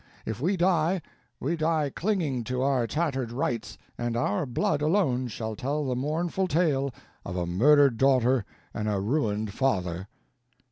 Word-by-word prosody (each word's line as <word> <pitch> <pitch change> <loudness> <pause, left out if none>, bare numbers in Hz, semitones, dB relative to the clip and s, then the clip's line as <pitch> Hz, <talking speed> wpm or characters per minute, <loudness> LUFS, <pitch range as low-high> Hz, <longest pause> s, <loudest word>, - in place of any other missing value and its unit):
If 110 +2 -4
we 185 +6 +1
die, 175 -1 +2 0.4
we 155 +6 -1
die 155 -3 +1
clinging 165 - 0
to 125 +2 -1
our 130 -4 +2
tattered 135 -3 -1
rights, 120 -2 -2 0.2
and 120 -1 -1
our 110 +3 0
blood 125 +4 0
alone 150 -7 +2
shall 110 -1 -5
tell 145 +7 -2
the 130 -2 -1
mournful 165 +8 -1
tale 145 -5 +1 0.3
of 90 - -5
a 90 - 0
murdered 135 +8 +4
daughter 130 -3 +4 0.3
and 105 -1 -2
a 100 -2 0
ruined 105 -2 -1
father." 95 -8 -1
135 Hz, 150 wpm, -27 LUFS, 115-155 Hz, 0.4 s, murdered